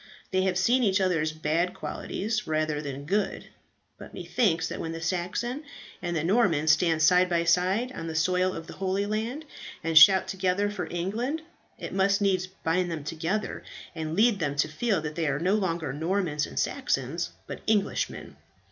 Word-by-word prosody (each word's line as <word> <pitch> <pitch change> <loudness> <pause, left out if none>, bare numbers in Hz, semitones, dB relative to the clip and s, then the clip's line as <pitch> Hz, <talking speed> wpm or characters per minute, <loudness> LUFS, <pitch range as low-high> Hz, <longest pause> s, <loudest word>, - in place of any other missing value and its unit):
They 185 -1 +2
have 185 -1 +1
seen 245 +6 +3
each 195 -3 +3
other's 165 -5 +1
bad 155 +3 -1
qualities 215 +1 -3
rather 155 -1 0
than 140 -1 -6
good; 200 +4 -1 0.5
but - - -11
methinks 170 -9 +1
that - - -6
when 165 - -4
the 165 - -5
Saxon 185 - -2 0.4
and 175 -1 -2
the 160 - 0
Norman 175 -5 +2
stand 160 +1 +3
side 180 +2 +5
by 170 -1 +1
side 185 +8 +2
on 165 -10 -6
the 160 - -5
soil 180 +3 +2
of 165 - -6
the - - -9
Holy 195 +1 -1
Land, 225 +9 -3 0.4
and 165 0 -1
shout 190 +4 +8
together 190 +2 0
for 190 -4 -4
England, 230 - -2 0.3
it - - -7
must 195 +1 +2
needs 190 -2 +1
bind 180 -1 -1
them 160 -3 -4
together, 165 +7 -3 0.3
and 160 -1 -4
lead 215 0 +4
them 145 -4 -1
to 145 - +2
feel 190 +3 0
that 150 -1 -4
they 165 0 -1
are 140 -1 0
no 180 +6 +1
longer 170 -9 -1
Normans 160 -1 -1
and - - -11
Saxons, - - -1 0.2
but - - -7
Englishmen. 210 -2 -1
180 Hz, 180 wpm, -27 LUFS, 160-200 Hz, 0.5 s, shout